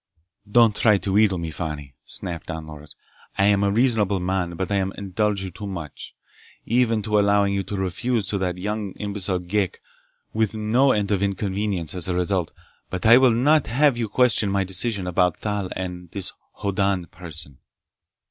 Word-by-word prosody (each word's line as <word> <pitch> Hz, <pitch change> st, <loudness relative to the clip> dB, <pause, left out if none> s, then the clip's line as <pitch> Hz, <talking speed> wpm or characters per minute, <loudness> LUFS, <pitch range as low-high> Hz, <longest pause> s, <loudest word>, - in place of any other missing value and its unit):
"Don't 115 Hz, -2 st, +5 dB
try 105 Hz, -2 st, +4 dB
to 100 Hz, -, -3 dB
wheedle 105 Hz, -2 st, +4 dB
me, 85 Hz, -2 st, -4 dB
Fani!" 75 Hz, -4 st, -5 dB
snapped 85 Hz, -2 st, -6 dB
Don 80 Hz, -1 st, -5 dB
Loris. 75 Hz, -1 st, -9 dB, 0.4 s
"I 100 Hz, -, +3 dB
am 100 Hz, -1 st, +3 dB
a 100 Hz, -, +3 dB
reasonable 105 Hz, -3 st, +2 dB
man, 90 Hz, -1 st, -1 dB
but 95 Hz, +3 st, -3 dB
I 100 Hz, -, +2 dB
indulge 100 Hz, +1 st, -1 dB
you 95 Hz, -, -5 dB
too 100 Hz, +4 st, -7 dB
much—even 110 Hz, -, -3 dB
to 105 Hz, 0 st, +2 dB
allowing 100 Hz, -1 st, +3 dB
you 100 Hz, -, 0 dB
to 100 Hz, -, -5 dB
refuse 100 Hz, +4 st, -1 dB
that 95 Hz, -3 st, -1 dB
young 105 Hz, 0 st, -3 dB
imbecile 100 Hz, -2 st, -2 dB
Ghek, 95 Hz, +2 st, -1 dB, 0.5 s
with 110 Hz, -1 st, 0 dB
no 115 Hz, +6 st, +3 dB
end 105 Hz, -2 st, 0 dB
of 100 Hz, -2 st, +1 dB
inconvenience 100 Hz, -3 st, -1 dB
as 90 Hz, -2 st, -3 dB
a 90 Hz, -, -1 dB
result. 90 Hz, -1 st, 0 dB, 0.4 s
But 95 Hz, +2 st, -4 dB
I 115 Hz, +3 st, +8 dB
will 130 Hz, -1 st, +6 dB
not 140 Hz, +6 st, +3 dB
have 140 Hz, +2 st, +3 dB
you 115 Hz, -2 st, -2 dB
question 115 Hz, -3 st, +3 dB
my 100 Hz, 0 st, +1 dB
decision 95 Hz, +2 st, -1 dB
about 90 Hz, -1 st, +1 dB
Thal 105 Hz, -3 st, -2 dB
and 90 Hz, -2 st, -5 dB
this 95 Hz, +1 st, -2 dB, 0.2 s
Hoddan 100 Hz, -2 st, 0 dB
person!" 80 Hz, -6 st, -5 dB
100 Hz, 170 wpm, -23 LUFS, 90-105 Hz, 0.5 s, I